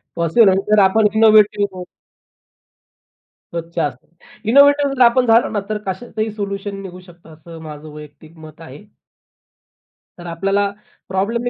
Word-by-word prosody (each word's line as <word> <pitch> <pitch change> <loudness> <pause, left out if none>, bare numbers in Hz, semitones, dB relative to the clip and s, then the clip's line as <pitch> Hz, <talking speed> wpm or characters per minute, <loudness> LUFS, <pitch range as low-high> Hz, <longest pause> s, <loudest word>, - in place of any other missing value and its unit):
Possible 170 +6 +3
आहे 190 +1 +1
जर 215 - +5
आपण 210 +3 +3
इनोव्हेटिव्ह 210 -3 +3 1.7
स्वच्छ 170 0 -7
असतात. 140 -5 -4 0.4
इनोव्हेटिव्ह 285 +1 +4
जर 255 - -3
आपण 245 +2 +3
झालो 230 0 +3
ना 210 - -2
तर 215 - -2
कशातही 215 +3 -4
सोल्युशन 200 -1 -6
निघू 180 -1 -10
शकतं 175 -3 -17
असं 165 +1 -13
माझं 155 -1 -10
वैयक्तिक 150 +2 -14
मत 155 0 -14
आहे. 150 +1 -12 1.4
तर 175 - -11
आपल्याला 195 +4 -1 0.4
प्रॉब्लेमने 230 +6 -2
195 Hz, 130 wpm, -18 LUFS, 165-215 Hz, 1.7 s, जर